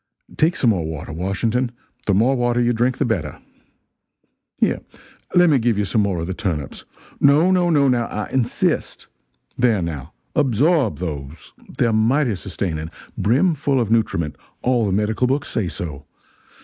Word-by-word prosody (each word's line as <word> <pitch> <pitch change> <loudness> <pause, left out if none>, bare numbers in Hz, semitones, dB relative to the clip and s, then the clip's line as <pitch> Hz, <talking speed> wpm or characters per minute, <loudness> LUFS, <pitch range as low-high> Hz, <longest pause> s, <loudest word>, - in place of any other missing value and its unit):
Take 165 +3 +2
some 120 - +3
more 90 -6 -1
water, 80 0 -6
Washington 110 +8 -1 0.4
the 100 - +3
more 120 +7 +3
water 120 -1 +1
you 120 0 +2
drink, 120 +2 +1
the - - +1
better. 90 - -2 1.2
Here, - - +2 0.6
let 175 0 +6
me 145 -5 +4
give 115 -2 +1
you 105 - +1
some 105 +3 +1
more 100 -4 0
of 80 - -3
the 95 - -3
turnips. 80 -8 -4 0.3
No, 150 +6 +5
no, 180 -2 +3
no, 145 -4 +4
now, 120 -2 +1
I 105 - -4
insist. 125 -3 0 0.5
There, 120 -4 +3
now. 80 -3 -5 0.2
Absorb 145 - +2
those. 75 -3 -6 0.2
They're, 115 -2 +2
mighty 120 +4 +2
sustaining 90 -5 -4 0.3
brim 135 - +2
full 140 -2 0
of 115 -3 -1
nutriment 105 -9 0 0.3
all 120 -3 +2
the - - 0
medical 105 +5 +1
books 135 +2 -1
say 105 -5 -1
so. 75 -4 -6
115 Hz, 160 wpm, -21 LUFS, 90-130 Hz, 1.2 s, let